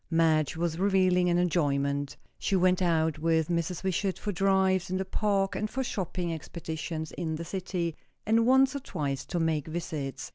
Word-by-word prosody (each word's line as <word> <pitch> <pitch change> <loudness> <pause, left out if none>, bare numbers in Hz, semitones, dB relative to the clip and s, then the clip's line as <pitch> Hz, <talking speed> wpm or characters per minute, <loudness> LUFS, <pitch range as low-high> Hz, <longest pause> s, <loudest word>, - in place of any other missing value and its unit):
Madge 160 -3 +2
was 170 0 -1
revelling 185 -2 +3
in 175 0 +3
enjoyment. 145 -5 0 0.2
She 195 - 0
went 185 0 +3
out 160 -3 +1
with 160 0 +1
Mrs. 170 +1 -1
Wishart, 190 +1 0
for 205 - -3
drives 190 -1 +2
in 185 - -1
the 190 - -2
Park 195 0 0
and 215 - -2
for 265 +4 -2
shopping 180 -6 -3
expeditions 160 0 -5
in 160 -2 -3
the 170 +2 -5
city, 175 -3 -3 0.3
and 225 +2 +3
once 265 +2 +5
or - - -1
twice 145 - -3
to 175 - -2
make 160 -3 0
visits. 150 -5 -4
175 Hz, 175 wpm, -29 LUFS, 160-190 Hz, 0.3 s, once